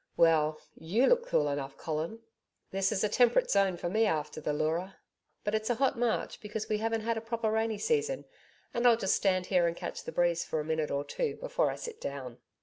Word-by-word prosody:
Well, 155 -2 +4 0.2
YOU 200 +11 +1
look 485 - +3
cool 150 - +2
enough, 140 -1 -3
Colin.' 160 +8 -3 0.5
'This 195 +2 +1
is 210 0 +1
temperate 240 0 +4
zone 195 -3 +3
for 175 - -3
me 220 +5 +2
after 155 -3 -2
the 150 - -1
Leura.... 160 +5 -1 0.5
But 205 - -1
it's 220 +1 0
a 240 - +2
hot 270 +2 +2
March 235 -2 -1
because 210 0 -4
we 215 -1 0
haven't 225 0 0
had 230 +1 -1
a - - -3
proper 225 -1 -1
rainy 220 0 0
season, 460 - 0 0.5
and 240 +1 +3
I'll 235 -2 +6
just 195 -4 +2
stand 185 -2 +1
here 180 -2 +3
and 170 - -2
catch - - -5
the - - -6
breeze 170 -1 +2
for 160 - -2
a 150 - -3
minute 160 -1 -1
or 140 0 -1
two 445 - -2
before - - 0
I - - -3
sit 465 -2 -8
down.' 130 -4 -6
205 Hz, 220 wpm, -30 LUFS, 160-230 Hz, 0.5 s, I'll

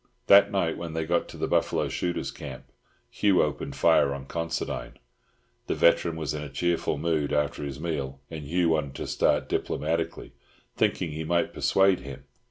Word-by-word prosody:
That 100 +1 +7
night, 90 -5 0
when 85 -2 -5
they 80 0 -2
got 85 +1 +1
to - - -10
the - - -1
buffalo - - +1
shooters' 90 -1 -2
camp, - - -8 0.5
Hugh 100 -3 +3
opened 75 -2 -3
fire 70 -1 +4
on 70 -1 -8
Considine. 85 +3 -4 0.7
The - - 0
veteran 85 0 +3
was 80 -3 -3
in 75 - -4
a 75 - -6
cheerful 85 +2 0
mood 75 -1 0
after 75 0 0
his 70 -1 -5
meal, 70 -5 -3
and 80 -2 -6
Hugh 85 +3 +1
wanted 75 -4 0
to - - -4
start - - +1
diplomatically, 80 +2 -2 0.4
thinking 80 - 0
he 80 +2 -4
might 85 +2 0
persuade 95 -1 +3
him. 70 0 -9
80 Hz, 175 wpm, -27 LUFS, 75-85 Hz, 0.7 s, That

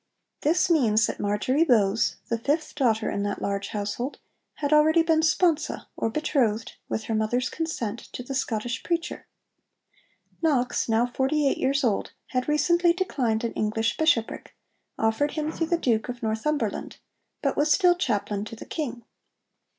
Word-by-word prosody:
This 330 +6 +3
means 225 -11 +3
that - - -4
Marjory 210 +9 +1
Bowes, 220 -7 +2
the 230 -1 -1
fifth 300 +6 -1
daughter 230 -6 +1
in 200 - -2
that 205 0 -2
large 200 0 -2
household, 210 +6 -3 0.4
had 290 0 -1
already 315 +2 +5
been 325 -1 +3
sponsa 320 0 +1
or - - -1
betrothed, 235 -5 0 0.2
with 220 - -2
her 225 - -3
mother's 220 +3 0
consent, 240 -9 -3
to 250 - -5
the 270 - -6
Scottish 240 -2 -2
preacher. 340 0 -3 1.1
Knox, 265 -8 +1
now 225 +2 +3
forty 270 +4 +1
eight - - 0
years 275 +2 +1
old, 220 -5 0 0.2
had 255 0 -1
recently 345 +3 +3
declined 250 - -1
an 230 - -2
English 220 +1 0
bishopric, 305 -8 0 0.4
offered 225 +7 +1
him 310 0 -2
through 330 0 -2
the 345 - +2
Duke 235 -7 0
of 245 -1 -6
Northumberland, 225 +2 -2 0.5
but - - +1
was 300 +1 +2
still 360 +2 +5
chaplain 205 - -1
to 225 - -8
the - - -10
King. 245 -7 -4
250 Hz, 160 wpm, -26 LUFS, 220-310 Hz, 1.1 s, already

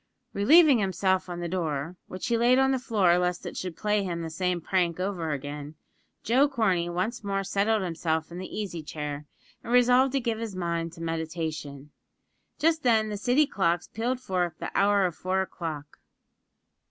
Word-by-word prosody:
Relieving 285 +5 +6
himself 190 -1 0
of 175 -1 -5
the 175 - -2
door, 165 -2 -2
which 185 - -6
he 235 - +1
laid 240 +2 +4
on 265 0 +4
the 265 - +1
floor 195 -8 +3
lest 180 0 -1
it - - -6
should 180 -3 -5
play 210 0 +1
him 170 -3 -3
the 160 - -5
same 180 +1 -1
prank 175 0 0
over 185 -4 -2
again, 145 +1 -5 0.5
Joe 265 +6 +3
Corney 190 -10 +1
once 215 +7 -2
more 195 -1 -1
settled 200 +2 +1
himself 160 -2 -2
in 175 - -7
the 185 - -6
easy 190 -6 -4
chair 150 -1 -6 0.4
and 235 - -6
resolved 250 +2 +5
to 275 - +2
give 230 -3 -2
his 225 -4 -5
mind 170 -2 -2
to 165 - -9
meditation. 160 -3 -4 0.7
Just 320 0 +2
then 220 -4 +3
the 210 - -3
City 245 +8 +3
clocks 175 -8 0
pealed 245 +3 -2
forth 180 -8 -2
the - - -5
hour 200 -1 +4
of 175 -3 -2
four 190 +1 0
o'clock. 155 -6 -7
185 Hz, 180 wpm, -27 LUFS, 165-225 Hz, 0.7 s, Relieving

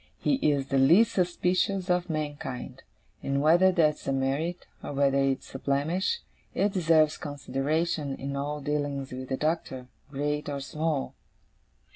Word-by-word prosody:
He 275 - +1
is 140 - +1
the 135 - +2
least 185 +12 +6
suspicious 185 0 0
of 180 -1 +1
mankind; 145 -4 -4 0.4
and 140 0 -1
whether 170 +6 +5
that's 155 -6 +1
a - - +1
merit, 140 +6 -1 0.2
or - - -5
whether 140 0 +2
it's 135 -1 -1
a 135 - -5
blemish, 160 - 0 0.3
it 200 0 +1
deserves 160 -4 +3
consideration 145 +1 -2
in 140 +1 -5
all 145 +2 -3
dealings 145 -2 -2
with 130 0 -6
the 130 - -1
Doctor, 140 -5 -2 0.2
great 150 +1 -2
or 140 -1 -3
small. 150 +1 -2
150 Hz, 145 wpm, -28 LUFS, 135-170 Hz, 0.4 s, least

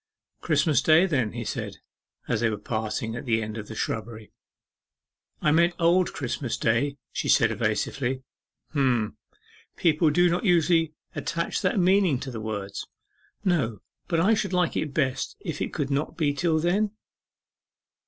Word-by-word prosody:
'Christmas 150 -2 +2
Day, 160 +3 +5
then,' 130 - 0
he 120 -1 -5
said, - - -4 0.5
as 115 - 0
they 115 - +3
were 105 - -2
parting 110 +1 -3
at 120 - -6
the 115 -3 +2
end 110 -1 -4
of 110 -2 -6
the 110 - -8
shrubbery. 110 -1 -4 1.1
'I 150 - +4
meant 170 +3 +3
Old 175 +2 +3
Christmas 125 -2 -3
Day,' 130 +5 +1
she - - -3
said 110 -1 +5
evasively. 120 +4 -1 0.5
'H'm, 125 -7 +1 0.6
people 160 -1 +3
do 175 +4 +4
not 175 +1 0
usually 165 -4 +3 0.2
attach 170 +1 -2
that - - +1
meaning 185 -6 +3
to 130 - -6
the 115 -2 -6
words.' 100 -2 -5 0.6
'No; 135 - +1 0.3
but 165 - +1
I 195 +7 +4
should 200 -3 -1
like 180 -1 +1
it 150 - -1
best 130 -3 -1
if - - -5
it - - -2
could 140 -1 -2
not 140 +2 -1
be 150 -4 +1
till 160 +2 +1
then? 195 +6 +1
140 Hz, 160 wpm, -26 LUFS, 115-170 Hz, 1.1 s, Day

